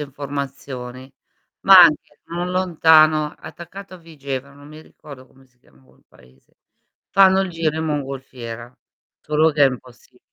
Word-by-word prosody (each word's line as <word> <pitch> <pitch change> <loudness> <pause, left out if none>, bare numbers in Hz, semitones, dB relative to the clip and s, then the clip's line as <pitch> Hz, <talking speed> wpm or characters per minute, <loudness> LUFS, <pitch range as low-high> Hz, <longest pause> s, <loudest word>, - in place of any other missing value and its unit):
informazioni? 135 -2 -8 0.5
Ma 195 -1 +7
anche 155 -3 +2
non 175 +2 -5
lontano, 160 -4 +3
attaccato 175 +5 -12
a - - -10
Vigevano, 140 -4 -8
non 145 +1 -15
mi 155 +1 -13
ricordo 140 -4 -15
come 135 +1 -24
si 130 -1 -39
chiama 65 - -27
quel 65 0 -28
paese, 65 +2 -25 0.5
fanno 190 -1 +4
il 190 - -3
giro 165 -2 -3
in 160 - -3
mongolfiera. 130 -5 -7 0.4
Solo 155 +1 +1
che 145 -1 +2
è 140 - +6
impossib 125 0 -11
145 Hz, 145 wpm, -20 LUFS, 130-160 Hz, 0.5 s, Ma